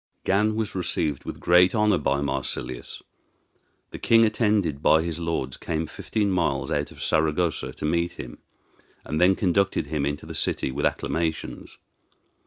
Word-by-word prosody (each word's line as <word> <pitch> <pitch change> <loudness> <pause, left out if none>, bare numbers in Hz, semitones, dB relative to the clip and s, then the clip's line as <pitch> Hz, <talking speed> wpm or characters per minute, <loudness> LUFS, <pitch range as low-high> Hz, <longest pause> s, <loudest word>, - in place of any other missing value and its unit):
Gan 105 +3 +2
was 110 -2 -2
received 80 -6 -1
with - - -6
great 90 +3 +5
honor 105 -4 +3
by 70 -1 0
Marsilius. 65 -2 -4 0.9
The - - -7
king, 115 0 +5
attended 105 - +1
by 80 +1 +4
his 85 -1 -3
lords, 80 -6 -2
came 80 0 -2
fifteen 105 +5 -2
miles 70 -7 0
out - - -1
of - - -9
Saragossa 80 +1 +1
to - - -6
meet 85 +2 0
him, - - -9 0.7
and 75 +2 -2
then 95 +2 +5
conducted 100 -1 +1
him 75 0 -2
into 75 +1 -4
the - - -7
city - - -1
with 70 +2 +1
acclamations. 80 -1 -3
85 Hz, 155 wpm, -25 LUFS, 75-95 Hz, 0.9 s, great